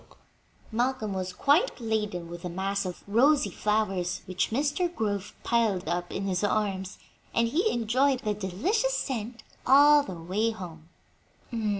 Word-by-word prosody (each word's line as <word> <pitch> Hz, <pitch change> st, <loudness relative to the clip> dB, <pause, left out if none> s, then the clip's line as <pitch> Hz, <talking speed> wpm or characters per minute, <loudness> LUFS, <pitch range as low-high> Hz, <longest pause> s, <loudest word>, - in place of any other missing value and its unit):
Malcolm 235 Hz, -2 st, -1 dB
was 185 Hz, -1 st, -3 dB
quite 290 Hz, -, +2 dB
laden 210 Hz, -6 st, -2 dB
with 170 Hz, 0 st, -8 dB
the 180 Hz, -, -4 dB
mass 195 Hz, +3 st, -2 dB
of 180 Hz, -, -7 dB
rosy 240 Hz, +2 st, +3 dB
flowers 195 Hz, -4 st, -1 dB
which 185 Hz, 0 st, -1 dB
Mr. 290 Hz, +8 st, 0 dB
Grove 205 Hz, -2 st, -2 dB
piled 220 Hz, -7 st, +1 dB
up 175 Hz, +1 st, -2 dB
in 195 Hz, -, -3 dB
his 185 Hz, 0 st, -1 dB
arms, 195 Hz, -2 st, -1 dB, 0.4 s
and 230 Hz, 0 st, +3 dB
he 355 Hz, -, +2 dB
enjoyed 255 Hz, +3 st, +1 dB
the 210 Hz, -3 st, -1 dB
delicious 355 Hz, -, 0 dB
scent 235 Hz, -, -4 dB, 0.2 s
all 290 Hz, +3 st, +7 dB
the 190 Hz, -10 st, -7 dB
way 195 Hz, +7 st, 0 dB
home. 170 Hz, -7 st, -8 dB
210 Hz, 140 wpm, -28 LUFS, 185-255 Hz, 0.4 s, all